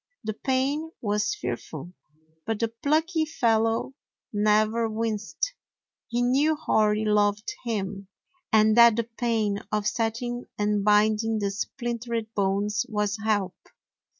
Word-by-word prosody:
The 215 - -2
pain 275 +7 -1
was 205 -2 0
fearful, 135 +7 -6 0.5
but 225 -1 0
the 230 - 0
plucky 315 +8 +1
fellow 225 -4 +1 0.4
never 215 +2 +2
winced. 220 - -2 0.5
He 240 0 0
knew 280 +6 +3
Hori 215 -8 +1
loved 210 0 +1
him, 200 -3 -3 0.4
and 215 0 +5
that 235 -2 +8
the 235 - 0
pain 225 -3 -1
of 210 -1 0
setting 240 +2 -2
and 210 -1 +1
binding 215 +2 +3
the 200 -2 -1
splintered 235 +1 -4
bones 205 +1 0
was 210 -2 0
help. 205 -4 +1
220 Hz, 120 wpm, -26 LUFS, 210-235 Hz, 0.5 s, that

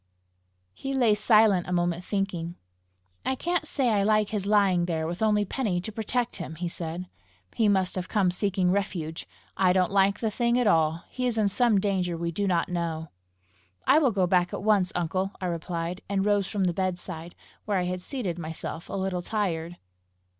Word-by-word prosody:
He 270 - -4
lay 240 -5 +4
silent 210 -3 +4
a - - -4
moment, 175 0 0
thinking. 180 -4 -2 0.7
"I 265 - 0
can't 345 +2 -1
say 265 -5 +1
I 210 -3 +2
like 215 0 +3
his 205 -2 -2
lying 195 -4 +3
there 160 -2 -1
with 175 +4 -4
only 210 -1 +3
Penny 205 -5 -1
to 200 +5 -5
protect 235 +3 -1
him!" 160 -3 -6
he 175 +2 -3
said. 170 +1 -5 0.5
"He 220 - +2
must 190 -2 +2
have 185 -1 -4
come 195 -5 +2
seeking 185 -1 +1
refuge! 175 -5 -2 0.3
I 185 -1 +3
don't 185 -1 +2
like 195 +1 +3
the 220 -2 -1
thing 235 +2 +1
at 245 - +2
all! 160 -4 +2
He 255 0 -1
is 235 -2 -1
in 210 -2 +3
some 230 0 +3
danger 185 -4 0
we 170 0 -2
do 200 +4 -1
not 175 -3 +1
know!" 165 -3 -3 0.8
"I 295 - +6
will 285 -5 +3
go 195 -4 +1
back 180 0 +2
at - - -6
once, 200 -4 +3
uncle," 185 +3 -1
I 185 - -4
replied, 170 +1 -3
and 195 -1 0
rose 205 -2 +2
from 195 0 -1
the 180 -2 +1
bedside, 175 -2 -4 0.3
where 205 -2 0
I 180 - +1
had 180 0 -3
seated 185 - -4
myself 160 0 -6
a - - -6
little 190 -2 -1
tired. 175 -4 -2
190 Hz, 195 wpm, -27 LUFS, 175-210 Hz, 0.8 s, I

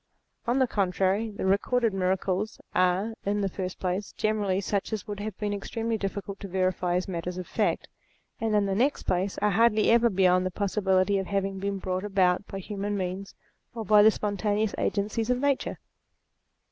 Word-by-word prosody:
On 240 +2 +2
the 260 - +4
contrary, 195 0 0
the 200 -2 -5
recorded 220 +4 +2
miracles 190 +2 -1
are, 185 +5 +2
in 205 +1 0
the 195 - +1
first 185 -1 -5
place, 185 +2 -2
generally 205 -3 0
such 200 +1 -2
as 215 -3 -2
it - - -38
would 205 -1 -5
have 210 -1 -5
been 205 -1 -2
extremely 225 +3 -2
difficult 200 -1 -4
to 200 - -6
verify 185 -1 0
as 180 - 0
matters 180 0 -4
of 185 - -4
fact, - - -1 0.5
and 220 -1 0
in 205 -1 +3
the 195 - 0
next 255 +8 +1
place, 185 +2 -1
are 210 - +4
hardly 220 +1 +4
ever 235 0 +5
beyond 185 -2 +3
the 185 - 0
possibility 195 0 +1
of 190 - -4
having 195 -1 -1
been 200 0 -2
brought 185 0 -3
about 190 -2 +2
by 195 - -6
human 205 +1 -3
means 190 +1 -4 0.4
or 225 -2 -4
by 210 +1 +6
the 215 - +8
spontaneous 210 0 -1
agencies 215 +3 -1
of 250 - +3
nature. 280 0 0
200 Hz, 185 wpm, -27 LUFS, 185-215 Hz, 0.5 s, the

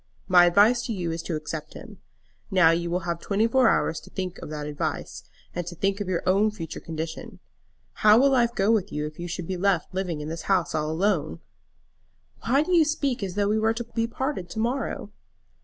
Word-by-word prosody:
My 180 -2 +7
advice 215 +7 +4
to 230 - -2
you 175 -4 -3
is 165 0 -3
to 165 -1 -4
accept 155 0 -6
him. - - -11 0.5
Now 180 -5 +5
you 170 +1 -1
will 180 +2 -1
have 170 -1 -3
twenty 205 +4 0
four 245 +1 +4
hours 160 - +1
to 185 - -15
think 185 -1 -5
of - - -8
that 150 -1 -5
advice, 145 - -4 0.3
and 175 -1 -4
to 175 - -6
think 195 +4 -1
of 200 - -3
your 175 -2 -1
own 200 +4 +4
future 170 -7 -7
condition. 160 0 -6 0.6
How 210 +1 +5
will 275 +3 +5
life 240 -2 +2
go 195 +3 +2
with 210 -3 +1
you 150 0 -2
if 155 +1 -8
you 175 - -4
should 175 0 -5
be 185 +2 -3
left 190 -1 0
living 180 -4 -2
in 150 - -5
this 165 +1 -5
house 180 -3 +2
all 155 0 -1
alone?" 160 - 0 1.1
"Why 275 +5 +4
do 365 - -4
you 330 - +6
speak 290 -5 -1
as 190 -2 -4
though 205 0 +1
we 215 +1 +2
were 225 +1 +1
to 240 - -3
be 230 0 -2
parted 250 -7 -3
to 220 - -5
morrow?" 245 +5 -2
185 Hz, 225 wpm, -25 LUFS, 165-220 Hz, 1.1 s, My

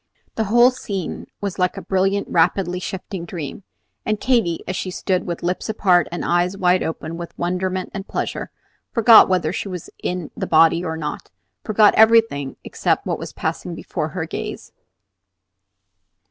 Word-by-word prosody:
The 220 - -1
whole 240 +4 +5
scene 200 -8 -5
was 200 -2 -4
like 180 0 +1
a - - -4
brilliant, 195 +1 0
rapidly 175 +2 +1
shifting 190 -1 -6
dream; 165 -2 -6 0.4
and 215 -1 -1
Katy, 230 -11 +1
as 185 - -2
she 185 - -3
stood 185 0 -1
with 170 -1 -4
lips 180 +4 -2
apart 180 -6 +3
and 175 - -4
eyes 175 +2 +1
wide 180 -1 +3
open 160 0 -4
with 170 0 -8
wonderment 185 +1 -2
and 195 0 -6
pleasure, - - -3 0.4
forgot 230 -3 +7
whether 180 -3 +1
she 200 - -3
was 180 -4 -7
in 180 -3 -3
the - - -4
body 165 +2 +4
or 160 -2 -3
not, 150 -2 -5 0.3
forgot 215 -1 +4
everything 220 -11 +4
except - - -1
what - - -2
was - - -7
passing - - -4
before - - -4
her - - -4
gaze. - - -6
185 Hz, 160 wpm, -21 LUFS, 175-200 Hz, 0.4 s, forgot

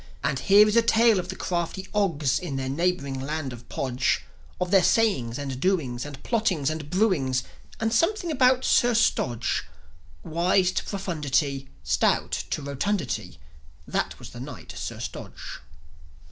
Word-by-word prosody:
And 130 - 0
here 205 +5 +6
is 210 - +1
a 235 - +7
tale 230 -2 +4
of 180 0 -5
the 190 - -4
crafty 175 +2 -3
Ogs, 165 -10 +1
In 170 -7 -5
their 130 -1 -2
neighbouring 140 -3 -1
land 145 -1 -3
of 120 -1 -12
Podge; 130 -1 0 0.4
Of 180 0 -1
their 195 -2 +6
sayings 135 - +2
and 135 -3 -4
doings 145 -8 0
and 140 -2 -10
plottings 190 - +1
and 155 -2 -5
brewings, 160 - +1 0.4
And 225 0 0
something 345 - +1
about 255 -2 +3
Sir 240 -1 +4
Stodge. 120 - +1 0.6
Wise 180 +3 +2
to - - -2
profundity, 150 -8 -1
Stout 65 -2 +1 0.2
to 150 - -2
rotundity, 140 - -2 0.5
That - - -2
was - - -10
the - - -9
Knight, - - -8
Sir - - -5
Stodge. - - -7
170 Hz, 150 wpm, -26 LUFS, 135-205 Hz, 0.6 s, a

